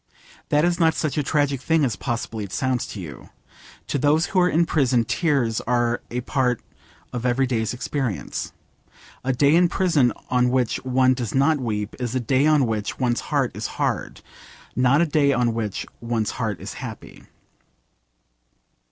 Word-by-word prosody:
That 150 +2 +3
is 175 0 +1
not 160 -1 +3
such 155 -3 -1
a 150 - +1
tragic 140 -2 0
thing 160 -1 +2
as 120 -7 -1
possibly 115 -1 -3
it 100 - -8
sounds 130 +1 -1
to 105 - -7
you. 75 -7 -9 0.6
To 140 - -2
those 150 +5 +3
who 190 - 0
are 180 0 +4
in 170 +1 +3
prison 130 -7 +2
tears 135 -10 +1
are 120 -1 +1
a 125 +1 -3
part 125 -2 0 0.5
of 120 -1 -3
every 125 +2 +2
day's 115 -4 -1
experience. 125 -3 -3 0.7
A 130 - +1
day 140 +3 +3
in 175 0 +4
prison 165 -10 +2 0.2
on 125 0 +3
which 125 -2 0
one 130 0 +3
does 120 -3 -4
not 145 +3 +3
weep 105 -4 -3
is 125 0 -3
a - - +2
day 130 +4 +2
on 150 -3 +4
which 110 -2 -2
one's 120 -2 +1
heart - - +1
is - - -4
hard, - - -2 0.5
not 130 +4 +4
a - - +4
day 145 -3 +2
on 120 -2 +1
which 110 -3 -3 0.2
one's 115 -3 -1
heart 110 -5 -3
is - - -7
happy. - - -9
130 Hz, 175 wpm, -23 LUFS, 120-145 Hz, 0.7 s, are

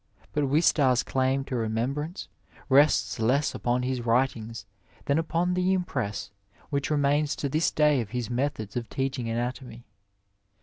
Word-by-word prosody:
But 150 -1 +1
Wistaria 140 -4 +3
claim 130 +1 +1
to 135 -1 -5
remembrance 125 - -2 0.4
tests 130 - +4
less 130 +6 +2
upon 125 +1 0
his 130 -1 -1
writings 115 -3 0 0.4
than 140 +2 +2
upon 170 +2 0
the 180 +1 +2
impress 130 - -2 0.4
which 140 -1 -1
remains 145 0 +2
to 140 - -2
this 155 +4 +1
day 150 -3 +3
of 110 - -6
his 125 0 -3
methods 120 -5 -2
of 120 -2 -3
teaching 130 -3 -2
anatomy. 120 0 -4
130 Hz, 140 wpm, -27 LUFS, 120-150 Hz, 0.4 s, tests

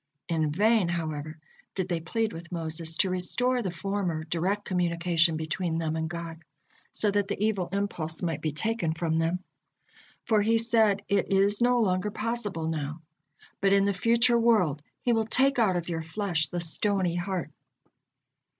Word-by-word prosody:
In 160 -2 0
vain, 210 +3 +3
however, 155 -2 -3 0.4
did 185 -2 -1
they 175 -2 -1
plead 220 +7 -2
with 170 +1 -9
Moses 160 -1 -3
to 190 - +2
restore 245 +8 0
the 195 - -2
former 180 -2 -2
direct 180 +6 -1
communication 170 -2 +1
between 165 +1 -2
them 160 -1 -1
and 160 0 -2
God, 170 -1 -7 0.5
so 210 - +1
that 205 0 +1
the 200 - -3
evil 200 -4 0
impulse 180 -6 -2
might 165 -4 -2
be 155 - -1
taken 190 +1 -1
from 165 -1 0
them. 170 +3 0 0.8
For 220 -2 +3
he 225 +2 +3
said: 220 -3 +3
"It 200 -1 +1
is 200 +3 +3
no 245 0 +4
longer 185 -1 +1
possible 210 -6 -3
now, 155 0 -4 0.6
but 195 0 +3
in 200 0 +4
the 200 - +2
future 235 +5 +3
world 210 -11 +3 0.2
He 240 - +2
will 225 -1 +1
'take 270 +2 +3
out 205 -5 +3
of 175 -1 -2
your 165 -2 -2
flesh 165 -1 -1
the 175 - -3
stony 185 +1 0
heart.'" 180 -2 -3
180 Hz, 170 wpm, -28 LUFS, 165-210 Hz, 0.8 s, no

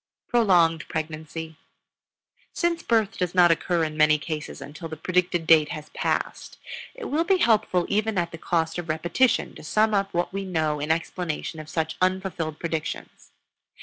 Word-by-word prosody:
PROLONGED 175 -9 +3
PREGNANCY. 160 0 -5 1.0
Since 340 -1 0
birth 225 -4 +1
does 180 -1 -1
not 175 -2 +6
occur 170 +1 +1
in 155 -1 -3
many 155 0 +5
cases 150 0 -5
until 155 +3 -8
the 160 - -7
predicted 180 0 0
date 160 -2 +6
has 150 -1 -7
been - - -13
passed, - - -2 0.4
it - - -7
will 310 +3 +1
be 380 +2 +3
helpful 215 - +2
even 215 0 0
at 170 -1 0
the 165 - -8
cost 165 0 0
of 170 -2 -7
repetition 170 +11 +1
to - - -12
sum 215 +7 +2
up 195 -1 +1
what 175 +2 -1
we 195 0 -2
know 160 -5 -1
in 150 +2 -3
explanation 165 0 -2
of 155 0 -9
such 160 0 -2
unfulfilled 185 -4 -1
predictions. 160 -2 -5
170 Hz, 170 wpm, -25 LUFS, 160-195 Hz, 1.0 s, not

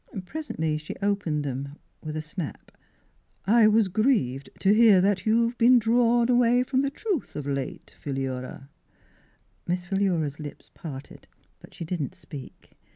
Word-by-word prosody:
Presently 160 - -3
she 155 - -7
opened 195 -7 0
them 140 +1 -4 0.3
with 155 -1 -4
a 155 - -3
snap. 155 +1 -7 0.4
'" - - -39 0.2
I 220 +2 +6
was 215 -1 +4
grieved 185 - +1
to 195 - +5
hear 215 -3 +6
that 195 +1 +1
you've 230 +2 +3
been 245 +2 +7
drawed 235 +1 +3
away 245 0 +4
from 260 +1 +1
the 275 - 0
truth 370 - -3
of 150 - -4
late, 140 -2 -4
Philura." 135 -1 -4 1.0
Miss 175 +1 -1
Philura's 175 -7 0
lips 150 -1 -9
parted, 145 -6 -9 0.3
but - - -16
she 170 - -6
did 170 0 -3
not 135 - -4
speak. 140 -3 -12
185 Hz, 155 wpm, -26 LUFS, 150-230 Hz, 1.0 s, been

